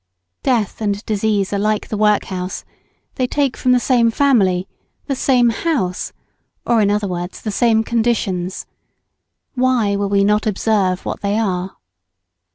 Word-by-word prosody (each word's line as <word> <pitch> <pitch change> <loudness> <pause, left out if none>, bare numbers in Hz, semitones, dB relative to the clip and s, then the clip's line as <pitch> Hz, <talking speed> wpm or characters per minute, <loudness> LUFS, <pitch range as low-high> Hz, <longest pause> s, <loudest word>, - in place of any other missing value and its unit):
Death 230 -6 0
and 205 0 -2
disease 210 -2 0
are 200 - 0
like 215 +1 -1
the - - -2
workhouse, 200 -3 0 0.5
they 255 - +1
take 280 -1 0
from 255 - +1
the 250 - +5
same 240 -2 +3
family, 200 -9 +2 0.4
the 275 - -2
same 250 -2 +3
house, 225 - -2 0.5
or 235 -2 +3
in 205 - +3
other 205 0 0
words, 175 0 -5
the 215 - -4
same 225 +1 +2
conditions. 210 -6 -1 0.9
Why 250 -5 +1
will 200 0 -1
we 200 0 +3
not 210 +2 +2
observe 200 -3 0
what - - -4
they 205 +1 0
are? 190 -4 -2
210 Hz, 150 wpm, -18 LUFS, 195-235 Hz, 0.9 s, the